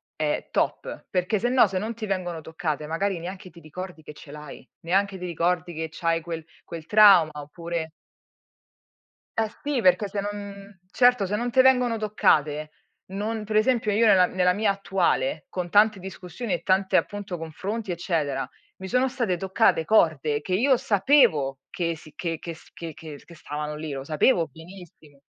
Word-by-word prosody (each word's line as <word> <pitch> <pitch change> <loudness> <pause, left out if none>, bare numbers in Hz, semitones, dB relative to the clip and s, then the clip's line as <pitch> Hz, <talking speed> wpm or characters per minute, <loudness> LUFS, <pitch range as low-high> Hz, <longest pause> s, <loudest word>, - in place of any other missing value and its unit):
è - - -2
top, - - -2
perché 185 +3 0
sennò 245 0 +4
se 190 -1 -3
non 215 +5 -3
ti 225 -1 -6
vengono 180 -4 -3
toccate 155 -2 -4
magari 180 +3 -1
neanche 185 +2 -8
ti 170 0 -16
ricordi 170 +1 -9
che 150 - -11
ce 145 -1 -13
l'hai, 150 -1 -10 0.2
neanche 195 +3 0
ti 180 - -6
ricordi 175 +1 -1
che 160 0 -4
c'hai 165 0 -1
quel 165 -1 -6 0.2
quel 165 -2 -8
trauma 195 -6 +7
oppure 160 +2 -5 1.5
Eh, 220 -1 +1
sì, 285 -4 0
perché 185 +1 +3
se 200 +1 -3
non 200 -1 -8
certo 245 -4 +4
se 200 +2 -2
non 240 +3 -2
te 260 - +6
vengono 250 -3 +3
toccate, 155 -8 +1 0.4
non 210 +3 -3
per 215 0 +2
esempio, 225 -2 +1
io 220 +3 +3
nella 185 -3 +6
nella 180 -1 +2
mia 205 +1 +1
attuale 175 -7 0
con 180 -2 -4
tante 210 +1 +4
discussioni 190 +3 -6
e 170 - -2
tante 190 +1 +1
appunto 205 -3 -1
confronti 190 +6 -5
eccetera, 160 -6 -2 0.3
mi 190 - -7
sono 250 +5 +2
state 240 -8 -1
toccate 185 -2 +2
corde 155 -6 +2
che 180 +5 -5
io 255 +7 +3
sapevo 195 - +3
che 170 -2 -2
sì 155 - -15
che 165 -3 -3
che 170 - -6
s 160 - -18
che 165 -2 -8
che 155 -2 -10
che 170 - -14
stavano 150 -1 -5
lì, 155 0 -6
lo 135 -1 -5
sapevo 165 - +2
benissimo. 160 -2 -15
180 Hz, 175 wpm, -25 LUFS, 160-205 Hz, 1.5 s, trauma